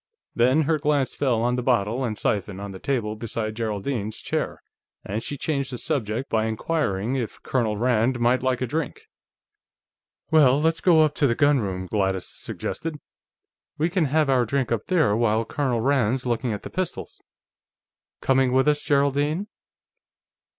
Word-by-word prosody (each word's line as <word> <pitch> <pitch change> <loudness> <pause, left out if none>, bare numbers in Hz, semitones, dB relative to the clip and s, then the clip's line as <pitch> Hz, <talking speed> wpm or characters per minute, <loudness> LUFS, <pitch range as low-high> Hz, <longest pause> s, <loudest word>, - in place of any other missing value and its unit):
Then 130 +6 +3
her 155 +1 +1
glance 145 -3 +1
fell 125 -5 0
on 125 +1 +1
the - - 0
bottle 120 0 +1
and 110 -4 -2
siphon 100 -2 -1
on 100 0 -6
the 95 - -9
table 115 -5 -1
beside 110 -1 -4
Geraldine's 110 0 -3
chair, - - -3 0.4
and 105 +3 -3
she 145 - -5
changed 140 -2 -2
the 125 - -4
subject 125 -4 -2
by 110 -1 +1
inquiring 110 -3 -1
if 120 -4 -5
Colonel 115 -5 0
Rand 120 +1 +1
mightn't 120 +2 +3
like 130 -1 0
a - - +1
drink. 160 - -4 1.3
"Well, 145 -4 +5
let's 160 +2 +1
go 165 -4 +5
up 150 - -1
to 145 - +2
the 115 - +1
gunroom," 110 -11 +1
Gladys 95 -1 -1
suggested. 160 -2 -5 0.8
"We 160 +3 0
can 180 -3 +2
have 150 +2 +2
our 130 -2 +3
drink 130 0 -1
up 115 -3 -1
there, 160 - +3
while 115 0 +1
Colonel 130 -3 -1
Rand's 130 -1 +1
looking 120 0 -1
at 105 - -4
the - - -8
pistols.... 185 -1 -4 1.0
Coming 130 -1 +3
with 130 +2 +3
us, 150 0 +3
Geraldine?" 145 +6 +1
125 Hz, 165 wpm, -24 LUFS, 110-145 Hz, 1.3 s, Well